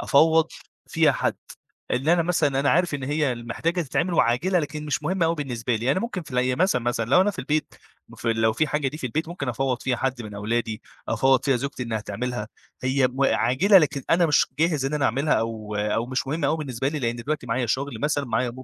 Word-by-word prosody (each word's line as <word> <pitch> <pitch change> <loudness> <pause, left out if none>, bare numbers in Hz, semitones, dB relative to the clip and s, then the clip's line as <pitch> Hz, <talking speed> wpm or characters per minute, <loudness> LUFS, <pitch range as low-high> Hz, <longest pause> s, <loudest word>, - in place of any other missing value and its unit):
أفوّض 160 +2 +4 0.4
فيها - - +3
حد. - - 0 0.6
اللي 135 +7 +2
أنا 170 -1 +3
مثلًا 145 -5 +1
أنا 140 - +2
عارف 175 -1 +2
إن 140 - -4
هي 145 -1 0
ال 120 -1 -8
محتاجة 170 +8 -1
تتعمل 170 +4 -1
وعاجلة 165 +10 +2
لكن 150 -1 -4
مش 145 0 -1
مهمة 170 +2 +1
أوي 165 - +1
بالنسبة 125 -5 -2
لي، 120 +5 +1
أنا 185 - 0
ممكن 230 -6 -4
في 150 - -14
الي 125 0 +1
مثلًا، 180 -8 +2
مثلًا 120 -1 0
لو 180 - +6
أنا 205 +2 +3
في - - -12
البيت 155 0 -1 0.3
مف - - -10
لو 110 -1 +2
في 155 +7 +1
حاجة 150 -2 0
دي 150 - -7
في 130 - -3
البيت 155 +7 -2
ممكن 160 -7 -5
أفوَّض 125 +1 -1
فيها 125 -2 0
حد 130 -1 -2
من 105 -1 -8
أولادي، 110 +2 -2 0.3
أفوَّض 130 -1 +3
فيها 135 -3 +3
زوجتي 135 +1 -4
إنها 110 -3 -2
تعملها، 105 +1 -4 0.3
هي 130 0 +2
م 130 +2 -3
عاجلة 135 - +4
لكن 140 -4 0
أنا 170 0 +4
مش 150 - +3
جاهز 155 -4 +1
إن 135 +2 -1
أنا 145 -2 0
أعملها، 140 +6 +1
أو 110 -2 -3
أو 105 +3 0
مش 130 +1 -2
مهمة 150 +1 -1
أوي 155 - +1
بالنسبة 135 -3 -2
لي، 150 - -3
لأن 120 -3 -1
دلوقتي 140 +2 -3
معايا 120 +1 0
شغل 140 +5 -2
مثلًا، 145 -1 0
معايا 120 +1 -1
135 Hz, 230 wpm, -24 LUFS, 120-155 Hz, 0.6 s, لو